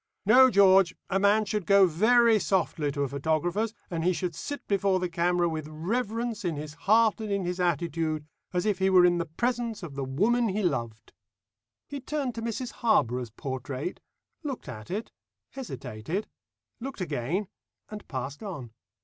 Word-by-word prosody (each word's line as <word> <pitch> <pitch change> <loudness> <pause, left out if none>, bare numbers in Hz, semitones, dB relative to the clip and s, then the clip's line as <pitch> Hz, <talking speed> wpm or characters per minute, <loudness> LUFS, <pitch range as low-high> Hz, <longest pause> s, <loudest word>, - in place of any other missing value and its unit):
"No, 260 0 +7
George, 195 -4 +5 0.2
a 195 - +2
man 205 +2 +4
should 210 -2 -3
go 200 -1 +7
very 220 +6 +4
softly 165 -7 0
to 140 0 -1
a - - 0
photographer's, 160 - 0 0.2
and 165 -2 -2
he 180 +2 +3
should 175 0 -3
sit 285 - -6
before 195 -1 +2
the 180 - -1
camera 175 +1 +1
with 155 -2 -4
reverence 220 +8 -2
in 170 -4 -1
his 150 +1 -6
heart 220 +7 +3
and 215 -2 -4
in 200 -2 0
his 180 +1 -3
attitude, 165 -2 -1 0.3
as 180 +1 -1
if 205 -3 +1
he 190 0 +3
were 185 -2 +6
in 175 -1 +3
the 170 - -2
presence 235 +4 -2
of 160 -5 -7
the 140 0 -3
woman 215 - +1
he 205 +2 -1
loved." 115 -9 -3 0.7
He 285 0 -5
turned 275 -1 -3
to 230 - -6
Mrs 235 +2 -3
Harborough's 125 - +2
portrait, 130 - -5 0.4
looked 280 - -5
at 110 -5 -8
it, 210 +5 -4 0.4
hesitated, 165 - -5 0.5
looked 265 0 -6
again, 170 - -2 0.4
and 210 -1 -9
passed 135 +1 -5
on. 150 - -7
185 Hz, 170 wpm, -28 LUFS, 155-215 Hz, 0.7 s, No